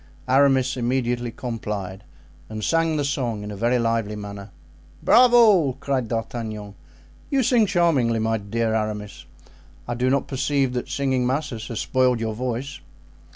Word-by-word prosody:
Aramis 135 -1 +3
immediately 120 -1 -1
complied, 105 -5 -5 0.5
and 110 -1 -6
sang 165 +2 +1
the 145 - 0
song 120 -7 -2
in 105 - -6
a - - -6
very 120 +5 +1
lively 115 -3 -1
manner. 100 -1 -8 0.5
"Bravo!" 230 - +6
cried 130 -2 -2
D'Artagnan, 110 -3 -4 0.6
"you 275 -2 +2
sing 230 -2 +3
charmingly, 155 - +2 0.3
dear 115 0 0
Aramis. 105 -2 -3 0.6
I 120 - -2
do 125 +2 0
not 135 +1 +1
perceive 135 -1 0
that 125 - -4
singing 130 -3 0
masses 130 -4 -3
has 115 - -4
spoiled 125 -2 +2
your 110 -1 -2
voice." 130 +4 -4
125 Hz, 140 wpm, -23 LUFS, 110-140 Hz, 0.6 s, Bravo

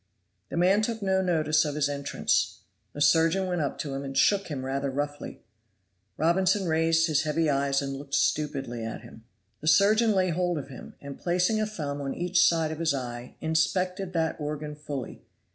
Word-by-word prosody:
The - - -4
man 190 +4 +4
took 225 -1 -2
no 190 -1 +2
notice 155 -4 +2
of 150 -2 -3
his 150 -1 +1
entrance. 140 -1 -1 0.3
The 145 - -6
surgeon 165 +6 +4
went 180 -2 -1
up 140 - -2
to 145 -3 -4
him 135 +1 -4
and 135 -1 -5
shook 200 -1 +3
him 135 -4 -5
rather 135 +1 -2
roughly. 145 +2 -5 0.7
Robinson 185 +4 +2
raised 165 0 +3
his 155 -4 +2
heavy 155 0 +1
eyes 140 0 +1
and 135 0 -3
looked 140 0 -5
stupidly 135 -6 -1
at 110 0 -5
him. 115 - -14 0.3
The 155 - -7
surgeon 210 +8 +5
laid 185 -3 +1
hold 175 0 0
of 140 -2 -6
him, 130 - -11
and 140 -1 -8
placing 180 +5 +1
a 215 - 0
thumb 145 -9 -4
on 135 -1 -3
each 175 0 +2
side 165 -2 +2
of 160 - -6
his 160 -4 +1
eye, 120 -2 -6
inspected 180 +4 0
that 160 -2 0
organ 150 0 -4
fully. 145 -4 -7
155 Hz, 190 wpm, -27 LUFS, 140-180 Hz, 0.7 s, surgeon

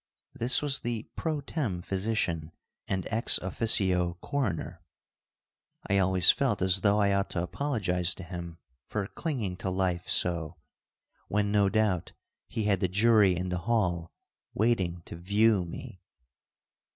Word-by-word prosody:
This 120 +5 +1
was 145 -1 0
the 115 -2 -3
pro 155 -3 -2
tem 120 - -3
physician 95 -6 -2 0.3
and 95 -1 -2
ex 115 +2 +3
officio 90 -3 +1
coroner. 90 - -3 1.1
I 100 0 +2
always 95 -2 +5
felt 125 -8 0
as 95 0 +3
though 105 +1 +3
I 100 -1 +3
ought 100 0 0
to 85 - -2
apologize 90 - -1
to 95 - -9
him 85 -1 -7 0.3
for 105 -2 -2
clinging 110 - -3
to 95 - -3
life 90 -1 -1
so, 85 -2 +1 0.7
when 105 0 0
no 100 -2 +3
doubt 100 -5 0 0.3
he 110 - -3
had 100 -3 +2
the 95 - +1
jury 105 0 +4
in 90 +1 -3
the 90 0 -2
hall 90 -7 0 0.4
waiting 95 -6 0
to - - -8
"view" 100 +2 +2
me. 85 - -9
95 Hz, 140 wpm, -29 LUFS, 90-110 Hz, 1.1 s, always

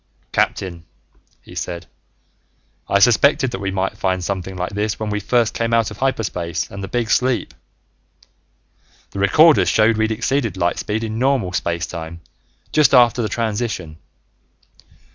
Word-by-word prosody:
"Captain," 85 -3 -1 0.6
he - - -14
said, 85 -1 -5 1.0
"I 100 - +4
suspected 125 +5 +4
that 95 - -5
we 100 - -2
might 95 0 -2
find 95 -1 0
something 95 0 -4
like 90 +1 -3
this 105 +1 -2
when 110 -1 -3
we 105 - -1
first 115 +2 +1
came 115 0 0
out 115 -2 +1
of 105 - -9
hyperspace 105 -10 -2
and 100 0 -7
the - - -4
big 115 +3 -2
sleep. 125 -3 +1 1.6
The 100 - -6
recorders 150 +11 +5
showed 110 0 +3
we'd 110 0 +1
exceeded 115 -1 -1
light 85 -1 0
speed 110 +2 -2
in 110 0 -4
normal 130 -8 +1
space 85 -1 -1
time 85 0 -8 0.5
just 145 -3 +4
after 120 -1 +5
the 110 - -2
transition. 105 -8 -3
105 Hz, 150 wpm, -20 LUFS, 95-120 Hz, 1.6 s, recorders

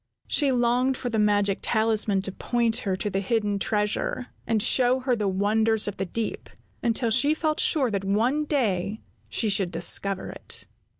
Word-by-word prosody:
She 285 -3 +1
longed 250 +1 +1
for 245 - -4
the 220 - 0
magic 205 -2 +2
talisman 220 -3 +1
to 195 - -4
point 235 +2 0
her 195 -2 -2
to 185 - -4
the 195 -1 -1
hidden 205 0 -1
treasure, 210 +5 -1 0.2
and 225 -1 +1
show 250 +3 +2
her 255 -1 +1
the 210 -3 -1
wonders 215 +3 +2
of 205 - -4
the 190 - -3
deep, 225 +5 -4 0.3
until 230 0 +1
she 285 +6 +3
felt 310 -1 -1
sure 270 -7 +2
that 200 -2 -2
one 235 +10 +1
day 215 - -1 0.3
she 225 - 0
should 195 -3 +2
discover 185 +3 0
it. - - -4
220 Hz, 175 wpm, -25 LUFS, 200-245 Hz, 0.3 s, she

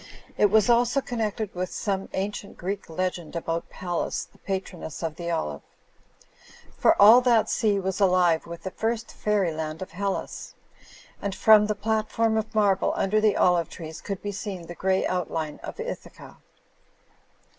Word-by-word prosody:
It 210 - +4
was 215 0 +4
also 240 +2 +3
connected 220 -5 -3
with 180 0 -3
some 195 -2 -2
ancient 200 +1 -4
Greek 195 +1 -4
legend 175 -1 -3
about 165 0 -3
Pallas 175 -2 -3
the - - -26
patroness 185 -5 -5
of 160 -2 -2
the 170 -1 -5
olive; 75 - -2 1.1
for - - +3
all 220 +5 +9
that 240 -3 +3
sea 205 -3 +2
was 190 +1 -2
alive 180 -4 +3
with 170 0 -8
the 190 - -4
first 225 +3 -2
fairyland 165 -7 -1
of - - -11
Hellas; 195 +3 -4 0.7
and 200 -1 -3
from 215 -1 +6
the 210 - -1
pktform 220 +1 0
of 220 +1 -6
marble 200 -3 +3
under 215 +2 +1
the 215 -2 +3
olive 175 -2 +3
trees 160 -1 -8
could 195 -2 -5
be 205 - -2
s^ 195 -3 -6
the 175 - -8
grey 190 +2 +1
outline 165 -4 -2
of - - -8
Ithaca. - - -7
195 Hz, 155 wpm, -26 LUFS, 175-215 Hz, 1.1 s, all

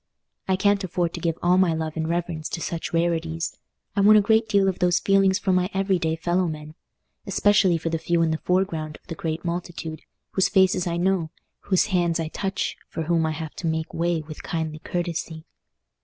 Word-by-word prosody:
I 190 - +3
can't 200 +1 +2
afford 175 -2 -1
to - - -5
give 165 -2 -1
all 180 +1 +4
my 175 -4 +3
love 160 -1 -3
and 160 0 -2
reverence 170 -2 -2
to 175 - -4
such 165 0 -4
rarities: 165 -1 -1 0.4
I 200 - +2
want 215 +2 +7
a - - +6
great 220 +1 +3
deal 200 -1 +3
of 190 - -1
those 180 0 +3
feelings 195 0 +3
for 195 -2 0
my 180 0 +2
every 195 -1 +1
day 160 -1 0
fellow 175 +2 0
men, 155 -1 -6 0.5
especially 205 -4 +3
for 165 +1 -3
the 165 - -1
few 170 +1 +1
in 160 - +1
the 160 - -1
foreground 170 -5 -1
of - - -40
the - - -6
great 160 +1 -4
multitude, 170 -2 -4 0.3
whose 190 - +2
faces 190 -2 +3
I 170 0 -1
know, 180 -2 +1 0.4
whose 185 -3 +3
hands 170 -2 +2
I 160 -1 -2
touch, 195 +3 -3
for 165 - -3
whom 165 0 +1
I - - -1
have 155 -1 -6
to 170 - -3
make 160 0 -2
way 170 -1 0
with 155 0 -9
kindly 160 -2 -3
courtesy. 165 -2 -4
170 Hz, 210 wpm, -24 LUFS, 160-185 Hz, 0.5 s, want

